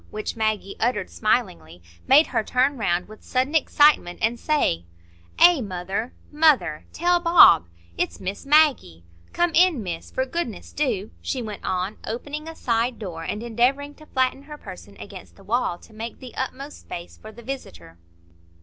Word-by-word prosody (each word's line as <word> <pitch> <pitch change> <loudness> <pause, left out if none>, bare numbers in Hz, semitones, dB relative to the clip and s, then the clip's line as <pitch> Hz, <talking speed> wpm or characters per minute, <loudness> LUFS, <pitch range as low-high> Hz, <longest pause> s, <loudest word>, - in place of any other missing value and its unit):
which 215 0 -5
Maggie 215 -3 -2
uttered 235 - -1
smilingly, 85 0 -1 0.3
made 290 +4 +7
her - - -1
turn 260 +5 +1
round 180 -7 -1
with 215 0 -14
sudden 260 +3 -1
excitement, 290 - +3
and 230 +2 0
say,— 285 - 0 0.5
"Eh, 345 -5 +6
mother, 195 +3 -4 0.2
mother—tell 310 - +2
Bob!—it's 85 - +4
Miss 195 +1 -5
Maggie! 275 - +3 0.3
Come 345 0 +1
in, 335 -8 +4
Miss, 170 -3 -6
for 260 - -1
goodness 260 - -5
do," 230 -9 -2
she 255 -3 -3
went 210 -2 -7
on, 185 +3 -2
opening 290 +7 -6
a 325 - -8
side 235 -1 -1
door, 175 -6 -7
and 210 +6 -4
endeavoring 255 +5 0
to 310 +1 -17
flatten 260 +1 0
her 300 +1 -10
person 195 -3 -12
against 195 -3 -11
the 195 - -17
wall 210 -3 -1
to 220 - -19
make 225 +2 -7
the 255 -3 -11
utmost 270 +2 -5
space 170 0 -9
for 215 - -10
the 235 +2 -14
visitor. 85 - -8
235 Hz, 160 wpm, -23 LUFS, 190-285 Hz, 0.5 s, made